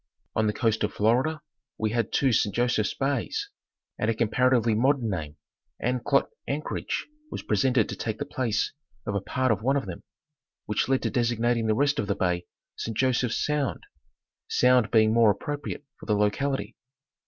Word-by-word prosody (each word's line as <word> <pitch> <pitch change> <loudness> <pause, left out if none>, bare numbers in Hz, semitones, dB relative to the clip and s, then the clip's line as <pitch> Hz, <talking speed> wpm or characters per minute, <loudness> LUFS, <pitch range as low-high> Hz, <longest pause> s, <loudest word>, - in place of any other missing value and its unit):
On 110 0 +2
the - - +2
coast 110 -2 +1
of 105 - 0
Florida 130 +9 +1 0.4
we 110 -1 0
had 115 -1 0
two 135 -3 +2
Saint 100 -2 +1
Joseph's 120 -3 +1
Bays, 135 -3 -1 0.5
and 110 - +1
a 115 - +1
comparatively 120 0 +2
modern 125 0 +2
name, 75 -5 -4 0.3
" - - -53
Anclote 125 +3 +1 0.2
Anchorage," 150 +2 -3 0.2
was - - -6
presented 115 +2 +2
to - - -5
take 110 -1 -3
the 145 - -3
place 120 -6 -1 0.3
of 105 - -2
a 100 - 0
part 130 +5 0
of 105 -2 0
one 135 +5 +2
of 135 - -2
them, - - -7 0.6
which 105 +4 0
led 135 -1 +2
to - - 0
designating 120 -2 +1
the 110 - +2
rest 145 +3 +2
of 100 - -1
the - - 0
bay 90 -1 -1
" - - -65
Saint 115 -2 -4
Joseph's 130 -2 +1
Sound," 145 - -1 0.6
Sound 125 -3 +4
being 110 -1 +4
more 115 -3 +5
appropri 145 -1 -4
ate - - -14
for - - -11
the 105 - +2
locality. 105 +2 0
115 Hz, 185 wpm, -27 LUFS, 110-130 Hz, 0.6 s, more